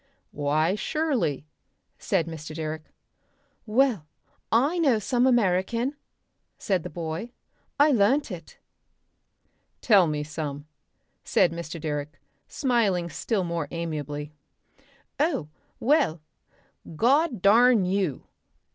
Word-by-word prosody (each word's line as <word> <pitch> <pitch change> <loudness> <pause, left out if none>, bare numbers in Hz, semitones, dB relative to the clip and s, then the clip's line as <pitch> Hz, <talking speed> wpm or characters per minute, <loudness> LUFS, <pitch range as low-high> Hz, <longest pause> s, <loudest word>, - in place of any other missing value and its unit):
"Why 150 +4 +1
surely," 250 - -1 0.5
said 190 -7 0
Mr. 155 -2 -8
Direck. 155 -1 -5 0.8
"Well, 220 - +2 0.4
I 280 +10 +2
know 275 -8 +3
some 245 +4 +1
American," 235 +3 +1 0.6
said 190 -4 0
the 180 - -7
boy. 170 +6 -5 0.5
"I 295 +1 +6
learnt 250 +3 +2
it." 170 -3 -9 1.2
"Tell 200 -7 +5
me 150 -1 -2
some," 145 -1 -5 0.6
said 170 - +3
Mr. 170 0 -6
Direck, 150 -1 -4 0.3
smiling 205 - 0
still 200 +5 -1
more 170 -3 -3
amiably. 150 -3 -5 0.9
"Oh! 280 - 0 0.3
Well 235 - +2 0.8
God 265 - +2
darn 225 0 +5
you! 185 -7 -1
185 Hz, 100 wpm, -26 LUFS, 155-240 Hz, 1.2 s, I